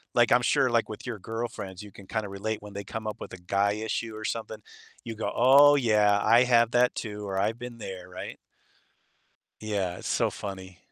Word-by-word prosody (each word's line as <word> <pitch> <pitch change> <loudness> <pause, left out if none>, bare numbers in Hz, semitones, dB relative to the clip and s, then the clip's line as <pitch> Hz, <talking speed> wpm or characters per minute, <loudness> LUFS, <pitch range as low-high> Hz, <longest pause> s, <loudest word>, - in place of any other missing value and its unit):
like, 120 -1 +4
I'm 125 - +5
sure, 130 - +3
like, 115 -1 +1
with 105 - -8
your 120 -4 -5
girlfriends, 110 -3 -6
you 105 - -12
can 100 - -14
kinda 110 -2 -2
relate 105 +2 -4
when 105 -1 -11
they 100 - -5
come 110 +1 -6
up 110 +2 -5
with - - -7
a 90 - -7
guy 100 +3 +1
issue 110 +1 -3
or 110 - -7
something. 110 -2 -4 0.4
You 115 -1 -5
go, 110 - -3
"Oh 140 +4 +7
yeah, 105 -6 +3
I 120 +2 +6
have 120 -2 +4
that 125 0 +3
too," 105 -2 -5
or, 95 0 -2
"I've 110 +4 0
been 120 -1 -8
there," 90 -3 -8
right? 90 - -8 1.2
Yeah, 100 -5 -2
so - - 0
funny. 95 -3 -8
110 Hz, 205 wpm, -27 LUFS, 100-115 Hz, 1.2 s, Oh